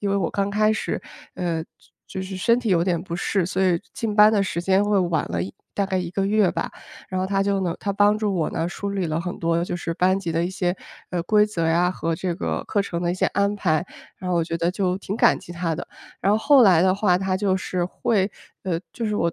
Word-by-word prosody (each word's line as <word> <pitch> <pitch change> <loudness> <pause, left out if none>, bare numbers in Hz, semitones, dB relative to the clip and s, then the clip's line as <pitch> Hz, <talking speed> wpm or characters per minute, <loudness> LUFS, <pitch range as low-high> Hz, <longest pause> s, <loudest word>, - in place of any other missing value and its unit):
因 200 -1 -1
为 200 - +2
我 175 -4 0
刚 200 0 -1
开 215 +1 +3
始， 220 - -2 0.3
呃， 170 -3 -2 0.4
就 190 - -5
是 190 0 -6
身 230 +6 +3
体 240 - -3
有 170 -2 +4
点 175 -3 0
不 170 -2 -6
适， 190 0 0
所 190 +2 -1
以 175 -2 +2
进 220 -2 -3
班 210 0 +7
的 205 -2 +3
时 170 -3 -2
间 190 +2 +3
会 205 -1 +2
晚 170 -4 +1
了 85 0 -1
1 95 - -6 0.2
大 200 - +1
概 190 -1 -1
1 180 - -3
个 195 +1 -1
月 205 -2 +3
吧。 - - -3 0.4
然 185 0 -2
后 185 - 0
她 195 0 +1
就 200 -1 +1
能 175 -3 -1
她 200 - -2
帮 205 +1 +4
助 210 -2 -1
我 165 -3 0
呢， 165 +1 -2
梳 200 +3 -4
理 195 -3 -1
了 155 +1 -1
很 180 +1 -5
多 165 0 +1
就 175 - -3
是 170 -1 -3
班 185 +3 +2
级 180 -4 -4
的 165 +1 +1
一 175 - -2
些， 180 -2 -1 0.4
呃， 175 -2 -1
规 210 +2 +4
则 175 -6 -2
呀， 175 +2 +3
和 165 -2 -2
这 175 +1 -2
个 - - -2
课 205 - 0
程 175 -3 -3
的 175 - +1
一 - - -1
些 185 - +1
安 200 +1 +1
排， 160 -4 +1 0.3
然 185 - -4
后 175 - +2
我 165 - +1
就 165 0 -3 0.4
挺 200 +1 -4
感 - - +4
激 175 - -10
她 170 -2 -2
的。 - - -6 0.3
然 195 - +3
后 215 - +3
后 280 +2 +6
来 185 -7 +6
的 185 +1 +4
话 195 -3 +2
她 190 0 0
就 190 -1 +1
是 180 -1 -2
会 195 +2 0 0.3
呃， 180 -3 -1
就 235 - -4
是 210 - -1
我 170 - +1
185 Hz, 275 characters per minute, -23 LUFS, 175-200 Hz, 0.4 s, 班